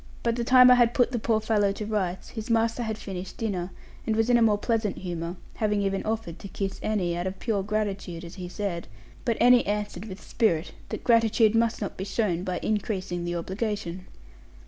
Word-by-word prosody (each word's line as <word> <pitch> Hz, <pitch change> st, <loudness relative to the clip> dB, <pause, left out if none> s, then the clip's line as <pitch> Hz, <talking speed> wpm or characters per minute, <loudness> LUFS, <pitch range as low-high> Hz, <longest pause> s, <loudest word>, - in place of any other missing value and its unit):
By 235 Hz, -, +2 dB
the 235 Hz, +1 st, -2 dB
time 250 Hz, +1 st, +8 dB
I 250 Hz, -1 st, +6 dB
had 235 Hz, 0 st, +3 dB
put 245 Hz, -1 st, +3 dB
the 240 Hz, -, -1 dB
poor 220 Hz, 0 st, +1 dB
fellow 215 Hz, -2 st, +2 dB
to 210 Hz, -, -5 dB
rights, 190 Hz, -4 st, -2 dB
his 220 Hz, -1 st, -7 dB
master 230 Hz, +1 st, +2 dB
had 220 Hz, -2 st, -2 dB
finished 190 Hz, -3 st, -7 dB
dinner, 190 Hz, -5 st, -2 dB, 0.4 s
and 220 Hz, -, +2 dB
was 225 Hz, +2 st, +2 dB
in 240 Hz, -, +6 dB
a -, -, +2 dB
more 215 Hz, -2 st, +4 dB
pleasant 220 Hz, -2 st, -1 dB
humour, 175 Hz, -1 st, -4 dB, 0.2 s
having 210 Hz, -2 st, +1 dB
even 195 Hz, 0 st, 0 dB
offered 220 Hz, -6 st, -3 dB
to -, -, -8 dB
kiss 195 Hz, 0 st, -4 dB
Annie, 185 Hz, -5 st, 0 dB
out 175 Hz, +2 st, -2 dB
of 190 Hz, +1 st, -5 dB
pure 215 Hz, -4 st, -1 dB
gratitude, 195 Hz, -4 st, -3 dB
as 170 Hz, -, -10 dB
he 180 Hz, -2 st, -7 dB
said; 185 Hz, -3 st, -3 dB, 0.4 s
but 230 Hz, -2 st, 0 dB
Annie 245 Hz, 0 st, +6 dB
answered 205 Hz, -2 st, -2 dB
with 195 Hz, -2 st, -8 dB
spirit 175 Hz, -7 st, 0 dB, 0.2 s
that -, -, -5 dB
gratitude 225 Hz, -2 st, +4 dB
must 230 Hz, 0 st, +1 dB
not 205 Hz, -, -4 dB
be 190 Hz, -, -3 dB
shown 190 Hz, -4 st, -1 dB
by 185 Hz, -2 st, -2 dB
increasing 190 Hz, -4 st, -2 dB
the 175 Hz, 0 st, -2 dB
obligation. 190 Hz, 0 st, -3 dB
210 Hz, 210 wpm, -27 LUFS, 185-225 Hz, 0.4 s, time